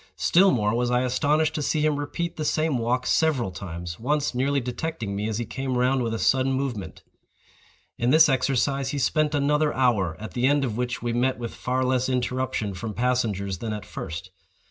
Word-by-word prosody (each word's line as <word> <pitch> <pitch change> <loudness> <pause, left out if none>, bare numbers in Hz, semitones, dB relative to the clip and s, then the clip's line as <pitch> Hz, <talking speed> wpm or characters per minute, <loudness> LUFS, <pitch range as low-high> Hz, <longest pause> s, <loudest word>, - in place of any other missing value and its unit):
Still 190 +3 +5
more 105 - +1
was 120 +1 0
I 125 +1 +2
astonished 150 +5 +1
to 155 - -2
see 150 +1 0
him 150 -2 +1
repeat 170 +4 -3
the 155 - -3
same 155 -3 +1
walk 125 +2 0
several 140 - +1
times—once 95 - -3
nearly 140 +3 +1
detecting 125 -3 -4
me 105 +2 -2
as 110 - -2
he 120 - -2
came 130 +2 -3
round 130 +1 +2
with 115 -2 -1
a 115 - -2
sudden 130 +3 +2
movement. 130 -7 -4 1.0
In 120 - +1
this 155 +3 +7
exercise 135 0 +1
he 145 - -3
spent 150 +2 +1
another 150 +1 +2
hour, 105 -11 +1
at 110 -2 -7
the 125 +1 +1
end 145 0 +3
of 115 -4 -3
which 125 0 -3
we 120 -1 -1
met 125 +2 +1
with 115 -1 -5
far 130 +1 -1
less 130 0 +1
interruption 125 -4 -1
from 105 +3 -6
passengers 110 -7 0
than 110 -2 -3
at 105 -2 -6
first. 85 +2 -7
125 Hz, 195 wpm, -25 LUFS, 115-140 Hz, 1.0 s, this